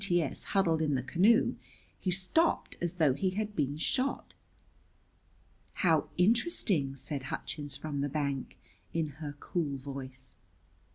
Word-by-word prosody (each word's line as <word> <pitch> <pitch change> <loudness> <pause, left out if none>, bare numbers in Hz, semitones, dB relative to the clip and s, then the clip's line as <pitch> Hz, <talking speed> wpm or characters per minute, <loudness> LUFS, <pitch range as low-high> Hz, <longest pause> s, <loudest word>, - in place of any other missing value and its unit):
T.S. 175 -6 +1
huddled 170 -5 +2
in 150 -3 +2
the 130 - -1
canoe 190 - +4 0.4
he 190 - -1
stopped 190 - +2
as 175 0 -1
though 155 -6 +4
he 185 +8 0
had 210 -1 -2
been 145 -2 0
shot. 255 - -1 1.5
"How 160 -4 +3
interesting!" 190 - +2
said 140 +1 -4
Hutchins 145 -3 -4
from 145 -1 -3
the 145 - 0
bank, 140 -2 -2 0.4
in 165 -2 0
her 145 -2 -5
cool 150 -5 -2
voice. 130 -1 -7
155 Hz, 130 wpm, -31 LUFS, 140-185 Hz, 1.5 s, canoe